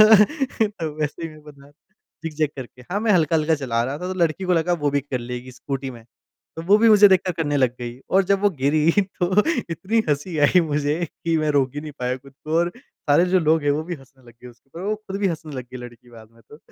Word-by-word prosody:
तो 215 - +3
वैसे 150 +2 -3
ही 165 - -3
मैं 155 -1 -14
बना 140 -2 -15 0.5
ज़िग-ज़ैग 155 -2 -1
करके। 125 -1 -9
हाँ 200 +3 -1
मैं 220 -1 +2
हल्का-हल्का 160 -2 +3
चला 120 -5 -1
रहा 135 +4 -4
था, 180 - -5
तो - - -5
लड़की 170 +2 +1
को 180 - +1
लगा 175 +1 +2
वो 150 -4 0
भी 140 0 +1
कर 135 -2 -4
लेगी, 125 +1 -7
स्कूटी 135 +1 -5
में। 115 -3 -12 0.5
तो 165 - -5
वो 200 +3 +6
भी 230 +1 +5
मुझे 210 -1 +8
देखकर 185 -1 +2
करने 150 -3 -1
लग 130 -3 +2
गई 120 +1 -6
और 190 0 +4
जब 195 +1 +1
वो 205 - +5
गिरी 150 +4 +3
तो 190 -2 -2 0.4
इतनी 200 +7 -1
हँसी 150 +3 -1
आई 180 - +4
मुझे 150 -2 0 0.3
कि 165 -1 +2
मैं 155 -1 +1
रोक 135 -2 +2
ही 145 - -4
नहीं 150 -1 -8
पाया 125 0 -1
खुद 135 +1 -16
को 155 +1 -1
और 175 +1 +1
सारे 165 - +1
जो 185 +1 +3
लोग 160 -1 +2
हैं, 145 - +2
वो 145 +2 0
भी 175 +1 -4
हँसने 135 -1 -20
लग 120 - -15
गए 125 - -10
उसके 120 +3 -19
ऊपर। 165 - -9
वो 215 - +1
खुद 210 -2 -7
भी 200 - +2
हँसने 160 -3 -5
लग 125 - -5
गई - - -5
लड़की 120 0 -12
बाद 110 -2 -14
में 115 - -22
तो। 150 - -13
155 Hz, 250 wpm, -22 LUFS, 135-180 Hz, 0.5 s, मुझे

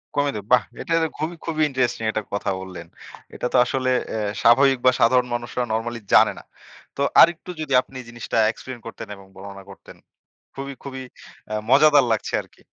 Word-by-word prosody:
কমে 145 0 +1
দেব 100 -1 -6
বাহ! 125 -3 +5 0.2
এইটা 165 - -3 0.2
খুবই, 160 +3 -3
খুবই 155 -2 -2
ইন্টারেস্টিং 125 -3 -1
একটা 110 - -3
কথা 100 - -2
বললেন। 90 -3 -9 0.5
এটা - - -5
তো - - +4
আসলে 130 0 -1 0.2
অ্যা 110 - -3 0.2
স্বাভাবিক 135 +3 +5
বা 130 - +7
সাধারণ 125 +2 +4
মানুষরা 120 +1 -3
নরমালি 115 +1 -2
জানে - - +6
না। - - -15 0.5
তো 140 - -4 0.2
আরেকটু 170 +1 +3
যদি 140 -3 -3
আপনি 130 0 -13
জিনিসটা 120 -1 -5
explain 125 +1 -10
করতেন 115 -1 -8
এবং 100 0 -15
বর্ণনা 100 0 -10
করতেন। 95 - -14 0.6
খুবই, 140 0 -6
খুবই 130 -1 -7 0.5
আ - - -1 0.2
মজাদার 145 -1 +6
লাগছে 110 - -2
আরকি। - - -24
125 Hz, 175 wpm, -22 LUFS, 115-140 Hz, 0.6 s, বা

